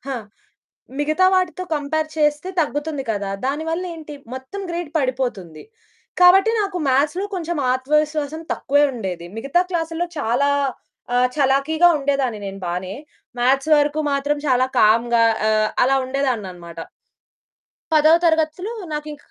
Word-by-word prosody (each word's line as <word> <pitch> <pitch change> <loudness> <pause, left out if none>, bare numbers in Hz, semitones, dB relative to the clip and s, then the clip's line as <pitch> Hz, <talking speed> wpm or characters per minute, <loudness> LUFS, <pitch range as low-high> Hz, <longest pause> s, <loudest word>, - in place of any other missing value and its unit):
ఆ! - - -2 0.8
మిగతా 310 +5 +2
వాటితో 370 0 0
కంపేర్ 310 +2 -1
చేస్తే 300 +3 +1
తగ్గుతుంది 290 -1 -2
కదా! 200 -2 -2 0.2
దాని 295 +4 -2
వల్ల 345 +3 -2
ఏంటి 310 -2 -9 0.2
మొత్తం 260 +10 -7
గ్రేడ్ 340 -3 -4
పడిపోతుంది. 245 - -3 0.6
కాబట్టి 380 +4 +7
నాకు 395 -3 -2
మ్యాథ్స్‌లో 295 +8 +1
కొంచెం 345 -3 -3
ఆత్మవిశ్వాసం 300 +3 0
తక్కువే 285 +2 +2
ఉండేది. 185 -7 -5
మిగతా 275 +9 +1
క్లాసుల్లో 335 0 -2
చాలా 275 +2 +1 0.7
ఆహ్, 250 0 +4
చలాకీగా 285 +5 +3
ఉండేదాన్ని 275 -5 -1
నేను 195 0 -6
బానే. 180 +2 -4 0.5
మ్యాథ్స్ 270 +5 +2
వరకు 295 +1 +1
మాత్రం 285 +1 0
చాలా 255 -1 +3
కామ్‌గా 230 +2 +4 0.3
ఆహ్, 215 0 +2 0.2
అలా 270 +2 +3
ఉండేదాననమాట. 200 -11 -3 1.1
పదో 310 0 +5
తరగతిలో 320 +5 +1 0.2
నాకింక 300 -1 -7
290 Hz, 120 wpm, -21 LUFS, 250-315 Hz, 1.1 s, కాబట్టి